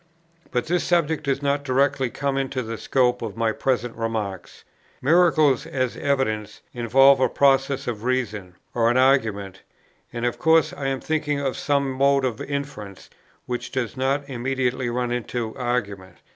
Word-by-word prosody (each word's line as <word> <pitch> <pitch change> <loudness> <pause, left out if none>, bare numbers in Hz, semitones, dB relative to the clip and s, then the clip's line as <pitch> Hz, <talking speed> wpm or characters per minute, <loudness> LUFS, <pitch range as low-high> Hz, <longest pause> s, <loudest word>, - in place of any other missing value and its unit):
But 125 - -1
that 175 +2 +1
subject 160 -4 0
does 140 0 -1
not 140 0 0
directly 135 -1 +1
come 140 +2 -2
into 135 -1 -2
the 115 0 -6
scope 125 -2 +1
of 115 -2 -5
my 115 -1 +1
present 120 0 -1
remarks. 110 -5 -4 0.4
Miracles 155 -2 +3
as 130 -6 -2
evidence, 130 -7 -1
involve 135 +3 +5
a 130 - +3
process 135 0 +2
of 110 -3 -4
reason, 110 -8 -2 0.2
or 115 -1 +2
an 120 - +2
argument; 110 -8 +1 0.5
and 120 0 -3
of 120 - -2
course 160 -1 +3
I 135 - -4
am 135 -1 -2
thinking 150 -2 -1
of 135 -2 -2
some 140 -1 0
mode 140 +1 +2
of 120 -3 -3
interference 140 -9 -6 0.3
which 125 -1 -4
does 130 -2 -3
not 135 +2 -1
immediately 130 -1 -1
run 120 0 -2
into 120 -1 -3
argument. 110 -7 -3
130 Hz, 160 wpm, -23 LUFS, 115-140 Hz, 0.5 s, involve